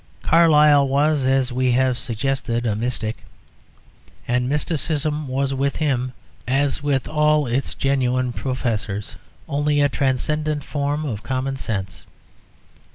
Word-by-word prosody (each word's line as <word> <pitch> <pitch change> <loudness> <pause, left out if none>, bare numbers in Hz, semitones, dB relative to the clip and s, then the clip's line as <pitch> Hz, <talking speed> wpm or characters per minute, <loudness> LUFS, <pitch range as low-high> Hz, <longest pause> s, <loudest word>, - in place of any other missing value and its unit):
Carlyle 150 -4 +5
was, 140 0 +2
as 130 -1 +1
we 125 0 +1
have 130 0 +2
suggested, 120 +1 -2
a 110 -3 0
mystic, 110 -1 -2 1.1
and 125 +1 0
mysticism 150 0 -1
was 135 +1 -1
with 140 +1 0
him, 130 -5 0 0.4
as 135 +3 +1
with 140 -3 0
all 150 -1 +2
its 125 +3 -2
genuine 130 -2 0
professors, 115 -6 -3 0.3
only 145 +1 +1
a 145 0 +4
transcendent 145 +3 -1
form 145 +2 -2
of 110 -7 -4
common 130 +3 -2
sense. 100 -7 -5
135 Hz, 120 wpm, -22 LUFS, 125-145 Hz, 1.1 s, Carlyle